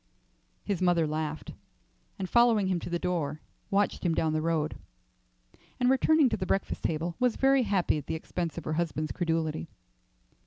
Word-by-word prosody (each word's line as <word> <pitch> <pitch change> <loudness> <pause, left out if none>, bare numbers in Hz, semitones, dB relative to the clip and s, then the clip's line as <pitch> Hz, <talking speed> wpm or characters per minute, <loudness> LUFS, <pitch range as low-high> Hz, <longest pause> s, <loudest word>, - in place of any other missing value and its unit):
His 200 -4 -2
mother 175 -3 +3
laughed, 155 0 -4 0.6
and 190 - -3
following 235 -2 +4
him 185 -2 0
to - - -7
the 175 - 0
door, 160 -4 -2 0.3
watched 200 +1 +1
him 170 -3 +1
down 160 -1 +1
the 155 - 0
road; 160 -2 -1 1.0
and 250 0 +4
returning 300 +2 +4
to - - -1
the 185 - -4
breakfast 195 - -1
table, 165 +2 -2
was 250 -2 +2
very 270 0 +4
happy 195 -8 +1
at 145 - -11
the - - -2
expense 165 0 -4
of - - -4
her 155 - -2
husband's 155 -2 -1
credulity. 160 - -1
170 Hz, 170 wpm, -29 LUFS, 155-200 Hz, 1.0 s, following